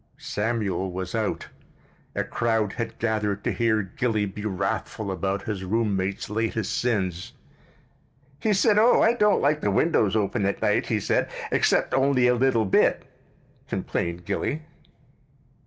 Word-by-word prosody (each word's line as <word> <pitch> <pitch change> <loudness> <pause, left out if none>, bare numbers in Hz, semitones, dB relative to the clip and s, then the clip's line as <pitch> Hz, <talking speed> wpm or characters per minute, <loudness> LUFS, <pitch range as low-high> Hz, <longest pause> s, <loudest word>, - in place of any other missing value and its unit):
Samuel 105 -3 -2
was 90 0 -5
out. 110 -2 -2 0.7
A - - 0
crowd 115 -3 0
had 115 -1 -5
gathered 105 -3 -1
to - - 0
hear 110 -3 +1
Gilly 105 +2 -1
be 100 +1 -7
wrathful 100 +1 -2
about 95 +1 -2
his 100 -3 -4
roommate's 100 -2 -1
latest 110 0 -2
sins. 95 -8 -1 1.1
"He 215 - +1
said, 210 +1 +4
'Oh, 235 +3 +5
I 225 - +5
don't 210 -3 +3
like 150 +2 +2
the 105 - +1
windows 105 - +2
open 105 -1 0
at 100 - -2
night,' - - +1
he - - 0
said, - - 0 0.2
'except - - +2
only 135 -2 +3
a 125 - +5
little 125 -3 +2
bit,'" 95 - +2 0.6
complained 85 0 -3
Gilly. 155 - -2
110 Hz, 140 wpm, -25 LUFS, 100-125 Hz, 1.1 s, Oh